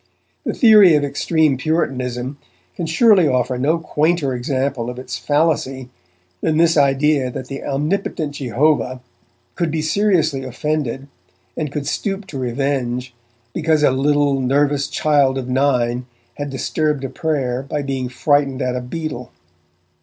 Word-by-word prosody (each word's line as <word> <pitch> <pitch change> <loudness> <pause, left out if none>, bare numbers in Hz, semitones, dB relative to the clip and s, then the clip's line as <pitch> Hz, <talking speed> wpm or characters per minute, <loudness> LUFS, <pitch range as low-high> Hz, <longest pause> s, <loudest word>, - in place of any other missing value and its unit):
The - - -2
theory 210 - +7
of 145 - +2
extreme 145 0 +1
Puritanism 130 -3 -2 0.4
can 170 - -3
surely 190 0 +5
offer 125 -1 0
no 155 +6 +2
quainter 155 -2 0
example 130 -1 -2
of 125 - -7
its 125 -1 -6
fallacy 135 0 0 0.5
than 155 -1 +1
this 165 0 +4
idea 140 -1 +2
that 125 +1 -7
the 135 - -6
omnipotent 150 +2 -2
Jehovah 130 0 0 0.5
could 170 -3 -1
be 155 0 -2
seriously 160 -6 +1
offended, 135 0 -3 0.5
and 150 -3 -3
could 145 -1 -4
stoop 195 +6 -3
to 140 - -6
revenge, 125 -1 -2 0.4
because 155 -2 +1
a 145 - +5
little, 140 +1 +2
nervous 140 +2 +1
child 140 -3 +2
of 130 -2 -4
nine 125 -2 +1 0.3
had 145 0 -5
disturbed 150 +1 -1
a 135 - -3
prayer 130 -3 -2
by 145 +2 -4
being 135 -2 -3
frightened 135 +1 +1
at 125 0 -1
a 125 - -2
beetle. 125 -2 -6
140 Hz, 140 wpm, -19 LUFS, 130-155 Hz, 0.5 s, theory